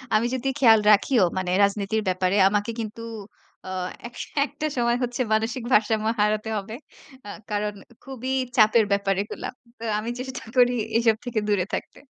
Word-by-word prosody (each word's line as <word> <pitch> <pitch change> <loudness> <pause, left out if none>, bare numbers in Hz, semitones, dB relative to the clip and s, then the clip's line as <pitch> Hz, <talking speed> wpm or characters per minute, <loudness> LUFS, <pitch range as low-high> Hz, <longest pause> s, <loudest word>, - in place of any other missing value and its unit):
আমি 215 +2 +3
যদি 265 +2 -2
খেয়াল 225 -5 +7
রাখিও 210 +1 +4
মানে 185 -1 -1
রাজনীতির 200 +2 0
ব্যাপারে 185 +2 +1
আমাকে 205 +2 -1
কিন্তু 220 +1 -7 0.7
আ - - -5 0.4
এক 240 - -15 0.3
একটা 295 +1 -6
সময় 235 0 +2
হচ্ছে 245 +1 -2
মানসিক 225 +3 -1
ভারসাম্য 215 0 +2
হারাতে 215 +1 +1
হবে। 205 +2 -6 0.5
আ - - -7 0.2
কারণ 210 0 -1 0.3
খুবই 265 -1 -5 0.3
চাপের 220 0 +5
ব্যাপার 200 0 +2
এগুলা। - - -6 0.3
তো - - -9 0.2
আমি 225 - -4
চেষ্টা 260 -1 -6
করি 245 0 +5 0.2
এসব 230 -1 +3
থেকে 240 -3 -1
দূরে 195 -3 +2
থাকতে। - - -7
220 Hz, 160 wpm, -24 LUFS, 205-240 Hz, 0.7 s, খেয়াল